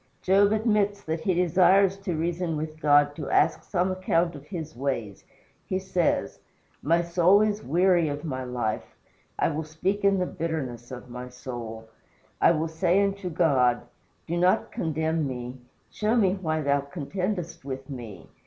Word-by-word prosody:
Job 200 +2 +4
admits 210 -2 +1
that 160 +1 -2
he 180 +3 0
desires 185 +2 +4
to 195 -3 -4
reason 170 0 -1
with 155 +1 -5
God 145 -1 +4
to 150 -3 -5
ask 155 +1 +2
some 185 0 0
account 175 -2 +1
of 145 -1 -11
his 160 -4 -6
ways. 120 -6 -3 0.4
He 185 - 0
says: 185 -2 0 0.4
"My 170 +4 +2
soul 175 +3 +4
is 215 0 +1
weary 175 +1 +3
of 145 +2 -5
my 130 -4 -3
life. 120 -4 -3 0.4
I - - +2
will 160 0 -3
speak 175 +7 -2
in 200 0 +4
the 180 - +1
bitterness 140 -9 -4
of 125 -1 -9
my 125 +1 -7
soul. 120 -3 -7 0.5
I - - +7
will 160 -1 +1
say 175 +3 +1
unto 200 -2 -2
God, 135 -8 +2 0.4
Do 170 +1 -2
not 180 +1 +2
condemn 160 -1 -1
me; 125 0 -6 0.3
show 215 +2 0
me 195 -6 +3
why 160 -5 -2
thou 140 -1 +2
contendest 175 +4 -4
with 135 -1 -6
me. 115 - -8
160 Hz, 160 wpm, -26 LUFS, 140-185 Hz, 0.5 s, I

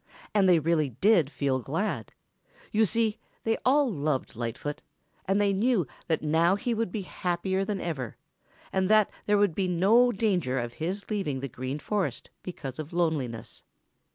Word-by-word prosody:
And 195 -3 +4
they 175 - +6
really 155 -2 +1
did 170 - +3
feel 140 -3 0
glad. 145 - -2 0.6
You 220 +1 +4
see, 220 +1 +1 0.2
they 225 0 +2
all 280 +2 +4
loved 145 - -2
Lightfoot 120 +5 -4 0.4
and 195 +2 +2
they 200 -1 +3
knew 210 - +2 0.2
that 160 -2 0
now 165 +4 +3
he 240 +3 -1
would 225 -4 -1
be 205 -1 -3
happier 185 +1 -1
than 200 -1 -2
ever, 135 -10 -4 0.6
and 190 0 +1
that 215 -1 +5 0.2
there 205 0 +4
would 200 -4 +3
be 190 +2 0
no 205 +8 +4
danger 185 - 0
of 120 -1 -3
his 185 - -4
leaving 185 -11 -1
the 140 - -4
Green 130 +3 -4
Forest 200 +5 -2
because 140 -7 -7
of 155 +2 -6
loneliness. 150 -10 -2
180 Hz, 165 wpm, -28 LUFS, 145-205 Hz, 0.6 s, they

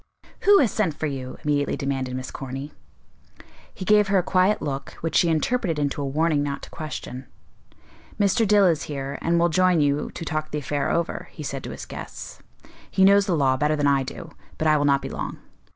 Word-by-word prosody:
"Who 405 0 +8
has 250 - +3
sent 185 -9 0
for 155 - -3
you;" 130 -3 -5
immediately 145 -2 0
demanded 135 -2 -2
Miss 130 0 -5
Corny. 135 +2 -6 1.0
He 185 - -8
gave 210 +1 +5
her 195 0 +3
a 180 - +2
quiet 185 +3 +2
look 140 -2 -4
which 165 - -3
she 170 - +4
interpreted 165 +2 0
into 145 0 -1
a 140 - -2
warning 155 +1 +1
not 140 -1 -3
to - - -10
question. 130 -4 -7 0.9
"Mr. 205 +3 +3
Dill 205 -1 +5
is 165 -4 +2
here, 140 -1 -4
and 170 +1 +1
will 170 +1 +3
join 185 +1 +3
you 145 0 +1
to 165 - -5
talk 155 0 -2
the 150 - -3
affair 145 0 -2
over," 170 0 -1
he 155 - -8
said 135 -2 -5
to - - -5
his - - -7
guests. - - -8 0.5
"He 190 - +4
knows 200 +1 +5
the 175 -4 +1
law 130 -2 +2
better 150 +2 +1
than 145 -1 0
I 140 -1 +3
do; 165 +5 -7 0.3
but 155 - 0
I 155 - +5
will 145 -1 +2
not 140 -1 +3
be - - -4
long." - - -5
155 Hz, 215 wpm, -24 LUFS, 140-180 Hz, 1.0 s, Who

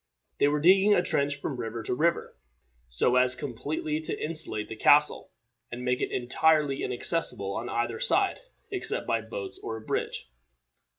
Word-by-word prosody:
They - - +4
were 150 +1 +1
digging 195 +6 +5
a 175 - +2
trench 140 -3 0
from 140 -2 -4
river 115 -1 -5
to 105 - -2
river, 170 +6 0 0.5
so - - +2
as 125 0 +3
completely 145 +4 -3
to 155 - -5
insulate 155 -9 0
the 110 - -7
castle, 145 +6 +4 0.4
and 125 +1 -6
make 125 0 0
it - - -1
entirely 145 +3 +1
inaccessible 120 - -1
on 120 +4 -4
either 120 -1 -2
side 395 -1 +2 0.3
except 395 +5 -3
by - - 0
boats 465 -6 -7
or 110 - -5
a - - -10
bridge. - - -3
140 Hz, 165 wpm, -27 LUFS, 120-165 Hz, 0.5 s, digging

